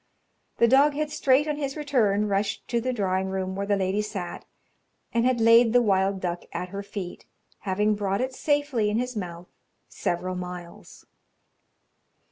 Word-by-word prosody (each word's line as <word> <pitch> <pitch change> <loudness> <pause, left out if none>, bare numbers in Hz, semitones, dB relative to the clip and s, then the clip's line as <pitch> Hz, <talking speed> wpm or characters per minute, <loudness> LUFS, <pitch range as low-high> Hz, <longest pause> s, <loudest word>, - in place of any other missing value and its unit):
The 235 - +5
dog 280 +4 +5
had 305 0 -2
straight 275 +2 +3
on 300 -1 -1
his 280 -1 -3
return 220 -9 +1
rushed 200 0 -1
to 235 -1 0
the 255 +2 -1
drawing 190 -5 0
room 190 0 -3
where 200 +1 -3
the 205 - +3
lady 195 +1 0
sat, 200 -4 -6 0.7
and 235 0 +2
had 255 -2 +1
laid 230 0 +6
the 245 - +6
wild 195 -2 +2
duck 175 -1 -2
at 180 +2 -4
her 200 +2 -5
feet, 200 -3 -7 0.3
having 210 +2 +1
brought 200 -1 -1
it 260 +1 -2
safely 290 -6 0
in 210 - 0
his 250 +1 -2
mouth 175 -3 -6 0.4
several 185 +1 -2
miles. 180 -1 -8
210 Hz, 165 wpm, -26 LUFS, 190-250 Hz, 0.7 s, laid